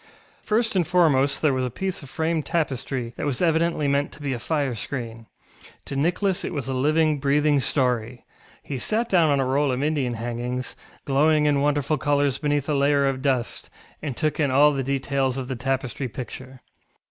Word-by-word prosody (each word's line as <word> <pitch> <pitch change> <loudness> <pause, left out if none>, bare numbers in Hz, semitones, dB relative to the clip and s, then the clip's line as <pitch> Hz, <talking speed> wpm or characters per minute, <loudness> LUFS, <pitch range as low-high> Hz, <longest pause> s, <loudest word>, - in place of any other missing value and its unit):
First 225 0 0
and 175 -4 +2
foremost 155 -6 +3
there 150 -3 +4
was 130 0 0
a 125 - -1
piece 190 +9 -4
of 140 - -11
framed 160 +1 -1
tapestry 135 -6 -2
that - - -3
was 135 -4 -1
evidently 165 -2 +1
meant 140 +1 +1
to - - -14
be 140 -2 -1
a 120 - -4
fire 145 -1 -1
screen. 115 -1 -6 0.6
To 140 - -5
Nicholas 180 +6 0
it - - -4
was 135 -4 -3
a 135 - -2
living, 155 +3 +2
breathing 145 +1 +2
story; 125 -3 -1 0.4
he 135 -3 -5
sat 225 - 0
down 170 -4 +4
on 140 -1 +2
a 135 - +1
roll 135 +2 +1
of 130 +2 -1
Indian 145 -6 0
hangings, 120 +2 -4 0.3
glowing 150 +2 +3
in 145 -2 +2
wonderful 145 0 +1
colours 145 -2 +1
beneath 145 -2 0
a 150 - 0
layer 140 0 +3
of 135 -1 -1
dust, 130 -4 -1 0.3
and 140 -5 -4
took 155 0 -1
in 145 -3 +2
all 145 +3 +5
the 135 - -1
details 135 0 -1
of 130 -2 -4
the 130 - -3
tapestry 130 +1 -2
picture. 130 +2 -8
140 Hz, 195 wpm, -24 LUFS, 130-155 Hz, 0.6 s, all